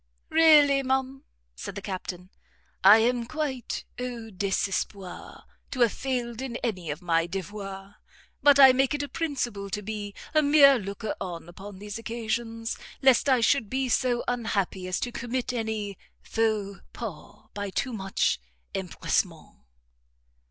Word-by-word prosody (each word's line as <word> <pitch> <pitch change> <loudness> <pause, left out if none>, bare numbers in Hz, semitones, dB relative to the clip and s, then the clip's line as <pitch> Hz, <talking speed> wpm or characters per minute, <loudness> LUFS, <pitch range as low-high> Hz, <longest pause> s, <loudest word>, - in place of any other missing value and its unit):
"Really, 300 -4 +6
ma'am," 265 0 -1 0.3
said - - -7
the 200 - -5
Captain, 185 -1 -6 0.5
"I 200 +3 +10
am 235 +1 +1
quite 265 -3 -3
au 240 -3 -5
desespoir 195 0 -3 0.3
to 255 - -3
have 235 -3 +4
failed 245 -3 -3
in 260 -3 -5
any 185 -9 -2
of 150 +5 -5
my 165 -1 +2
devoirs; 195 +1 -6 0.5
but 285 -1 +6
I 265 -1 +10
make 265 +2 +2
it 290 - -2
a - - -3
principle 245 -11 -3
to 210 +2 -3
be 205 -1 -5 0.2
a 310 - +5
mere 285 -3 +7
looker 200 +1 -4
on 175 -3 -5
upon 195 +3 -10
these 205 +2 -6
occasions, 230 0 -3 0.2
lest 265 +1 +5
I 255 -3 +4
should 230 -2 +2
be 260 0 -1
so 245 0 +1
unhappy 205 -6 -1
as 185 - -1
to 245 - -2
commit 245 +1 -3
any 220 -4 -3 0.2
faux 215 -3 -1
pas 200 -11 -8
by 205 -1 -4
too 250 +6 -2
much 195 - 0 0.3
empressement." - - -2
225 Hz, 145 wpm, -27 LUFS, 195-255 Hz, 0.5 s, I